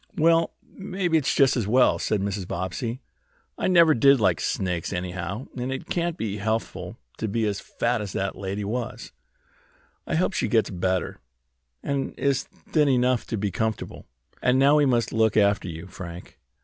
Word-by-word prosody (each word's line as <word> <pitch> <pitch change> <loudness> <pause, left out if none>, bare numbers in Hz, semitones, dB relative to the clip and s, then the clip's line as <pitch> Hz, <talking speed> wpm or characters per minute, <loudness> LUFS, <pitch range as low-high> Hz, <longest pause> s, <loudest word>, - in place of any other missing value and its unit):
"Well, 165 +1 +3
maybe 185 -3 -2
it's 135 - 0
just 135 -1 +4
as 115 -6 -1
well," 125 +4 +4
said 105 -2 0
Mrs. 100 -2 -3
Bobbsey. 115 +7 -3 0.5
"I - - -1
never 170 -4 +6
did 140 +2 +5
like 105 - +2
snakes, 90 -3 -2
anyhow, 90 +4 -4
and 125 +1 -3
it 135 - -6
can't 170 -1 -1
be 105 -2 -3
healthful 110 +2 -3 0.2
to 110 - -1
be 110 +2 0
as 100 -2 -1
fat 120 -1 -1
as 100 -2 -5
that 95 0 -2
lady 100 +1 -4
was. 115 +4 -4 1.0
I - - -1
hope 185 +4 +1
she - - 0
gets 110 -3 +2
better, 95 0 -1 0.6
and 140 -1 -2
is 140 -1 +1
thin 150 -3 0
enough 125 -1 +2
to 115 - -2
be 100 -1 -1
comfortable. 110 +4 -3 0.3
And 125 +1 +3
now 140 +3 +5
we 145 -2 +4
must 120 -3 +1
look 110 -1 +2
after 100 -2 +3
you, 85 0 -7
Frank. 90 -2 -10
115 Hz, 175 wpm, -25 LUFS, 100-135 Hz, 1.0 s, never